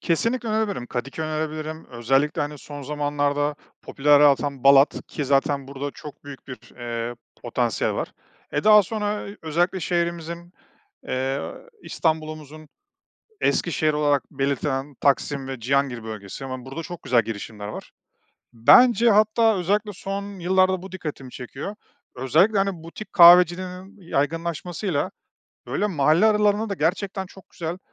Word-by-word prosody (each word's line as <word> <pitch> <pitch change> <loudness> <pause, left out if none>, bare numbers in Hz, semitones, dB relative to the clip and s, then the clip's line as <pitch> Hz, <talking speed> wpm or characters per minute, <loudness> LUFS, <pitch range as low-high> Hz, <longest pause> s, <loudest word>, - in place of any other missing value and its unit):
Kesinlikle 230 +8 0
önerebilirim. 215 - -1
Kadıköy 135 +6 -4
önerebilirim, 155 0 -4
özellikle, 135 +6 +1
hani, 145 0 -5
son 145 +1 -9
zamanlarda 145 0 -1 0.3
popülerliği 145 +1 +4
artan 140 -1 -1
Balat 140 +1 +5
ki 145 - -4
zaten 140 0 +1
burada 140 +1 -5
çok 145 0 -12
büyük 140 -1 -11
bir, 130 -2 -7 0.2
eee, 120 -1 -4 0.3
potansiyel - - -1
var. - - -4 0.4
Eee, 145 - -1
daha 210 -1 +8
sonra 210 +1 -3 0.2
özellikle 175 +4 0
şehrimizin, 170 0 -3 0.6
eee, 135 +2 -1 0.4
İstanbul'umuzun 155 -1 -3 0.7
eski - - +1
şehri 155 -2 +1
olarak 145 -2 +2
belirtilen 140 0 -2
Taksim 140 -1 +1
ve 135 -2 -6
Cihangir 130 -1 0
bölgesi, 110 +2 -8
hemen 130 -1 -6
burada 135 +5 -6
çok 175 0 -9
güzel 120 -2 +3
girişimler 105 -1 -6
var. 105 - -8 0.6
Bence, 235 - +6
hatta, 215 +1 +4
özellikle 205 +4 0
son 200 +1 -6
yıllarda 185 +1 +2
bu 190 - -10
dikkatimi 150 -8 -7
çekiyor, 135 - -7 0.4
özellikle, 160 - +3
hani, 195 -4 -1
butik 170 +6 -10
kahvecilerin 180 +2 +5
yaygınlaşmasıyla 165 +2 -2 0.6
böyle 140 +12 -1
mahalle 160 +1 +3
aralarında 210 0 +2
da 200 - -2
gerçekten 190 +4 -1
çok 190 0 -17
güzel, 170 +1 -5
155 Hz, 130 wpm, -23 LUFS, 140-185 Hz, 0.7 s, daha